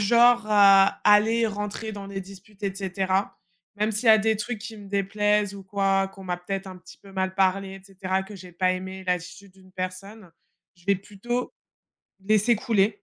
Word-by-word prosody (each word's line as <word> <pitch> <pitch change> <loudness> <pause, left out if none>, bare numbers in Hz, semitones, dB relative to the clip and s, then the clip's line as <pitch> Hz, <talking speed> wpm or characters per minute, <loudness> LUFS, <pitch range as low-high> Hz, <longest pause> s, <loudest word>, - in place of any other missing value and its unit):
genre 235 +2 +5
à 195 -2 +6
aller 220 +3 +5
rentrer 210 +1 -5
dans 200 -1 -8
des 195 -1 -5
disputes 195 +2 -14
et 195 -1 -2
cetera. 195 0 -2 0.4
Même 210 +2 0
s'il 215 +3 0
y - - +6
a 220 - +9
des 220 0 +1
trucs 240 +2 -4
qui 220 +2 -8
me 205 -1 -12
déplaisent 205 +1 +1
ou 200 - -9
quoi, 195 0 0
qu'on 195 0 -13
m'a 180 -1 -3
peut-être 195 +2 -5
un 185 -1 -8
petit - - -15
peu 195 - -16
mal 190 0 -2
parlé 195 0 +1
et 195 - -12
cetera, 190 -1 -2
que 205 +2 -11
j'ai 180 -2 -12
pas 185 +1 +1
aimé 190 +1 -6
l'attitude 180 +2 -4
d'une 185 0 -20
personne, 185 +2 -7 0.5
je 175 - -24
vais 200 - +4
plutôt 210 +6 -4 0.7
laisser 215 +4 +3
couler. 215 -3 +2
195 Hz, 195 wpm, -25 LUFS, 190-210 Hz, 0.7 s, a